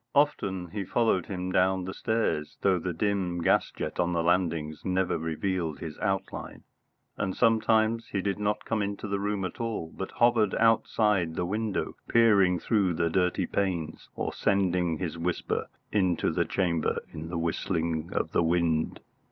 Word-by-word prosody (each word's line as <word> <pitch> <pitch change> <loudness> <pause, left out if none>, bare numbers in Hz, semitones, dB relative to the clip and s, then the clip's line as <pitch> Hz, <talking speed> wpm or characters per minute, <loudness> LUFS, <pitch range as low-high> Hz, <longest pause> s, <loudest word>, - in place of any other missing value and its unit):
Often 95 - +1
he 100 0 -3
followed 105 -3 +1
him 90 -1 -3
down 95 0 +2
the 95 - -5
stairs, 110 -9 -1
though 95 -2 +3
the 90 +2 -2
dim 90 0 -1
gas - - +3
jet - - -5
on 90 0 +1
the 85 -1 +1
landings 85 -3 0
never 95 0 +1
revealed 80 0 -2
his 75 +2 -6
outline; 95 -2 -3 0.5
and 95 - -2
sometimes 115 0 +3
he 100 - -2
did 100 +1 -1
not 105 0 -1
come 110 -2 0
into 100 +1 -3
the 100 0 -1
room 100 -1 -1
at 90 - -6
all, 110 -8 -3
but 95 - -4
hovered 115 -4 +3
outside 105 -6 +2
the 90 - -1
window, 105 +2 -2
peering 100 -6 +5
through 95 -4 +1
the 85 0 0
dirty 90 +1 +1
panes, 85 -6 -2
or - - -3
sending 90 -4 +1
his 85 -1 -4
whisper 85 +1 -1 0.2
into 95 -5 +2
the - - +1
chamber 85 -4 0
in 80 +1 -6
the 85 - -3
whistling 85 -1 -1
of - - -1
the - - +2
wind. 85 -1 +1
95 Hz, 165 wpm, -28 LUFS, 85-105 Hz, 0.5 s, peering